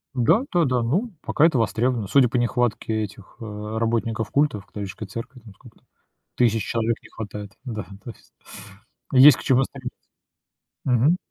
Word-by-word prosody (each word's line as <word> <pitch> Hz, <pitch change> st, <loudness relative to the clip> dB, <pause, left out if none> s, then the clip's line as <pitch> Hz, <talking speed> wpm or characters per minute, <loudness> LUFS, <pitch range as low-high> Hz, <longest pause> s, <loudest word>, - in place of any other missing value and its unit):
Да, 125 Hz, -, +3 dB
да, 175 Hz, -2 st, +3 dB
да. 125 Hz, -3 st, +1 dB
Ну, 185 Hz, -, 0 dB
пока 155 Hz, -, +2 dB
это 160 Hz, -6 st, +3 dB
востребовано. 115 Hz, +1 st, 0 dB
Судя 130 Hz, 0 st, +4 dB
по 125 Hz, -, -1 dB
нехватке 115 Hz, -2 st, 0 dB
этих, 105 Hz, -1 st, -10 dB
э, 105 Hz, 0 st, -6 dB
работников 115 Hz, 0 st, -1 dB
культов, 140 Hz, -9 st, +1 dB
католической 100 Hz, +1 st, -7 dB
церкви, 115 Hz, +6 st, -8 dB
там, 110 Hz, -4 st, -15 dB
сколько -, -, -18 dB
там, -, -, -38 dB, 0.5 s
тысяч 115 Hz, -3 st, +2 dB
человек 115 Hz, 0 st, 0 dB
не -, -, -16 dB
хватает. 105 Hz, -1 st, -8 dB
Да, 110 Hz, -6 st, -5 dB, 0.2 s
то -, -, -8 dB
есть. -, -, -22 dB, 0.8 s
Есть 135 Hz, 0 st, +9 dB
к -, -, -9 dB
чему 130 Hz, 0 st, +3 dB
стремиться. 130 Hz, -2 st, -8 dB, 0.9 s
Мгм. 130 Hz, +7 st, +3 dB
115 Hz, 165 wpm, -23 LUFS, 110-130 Hz, 0.9 s, Есть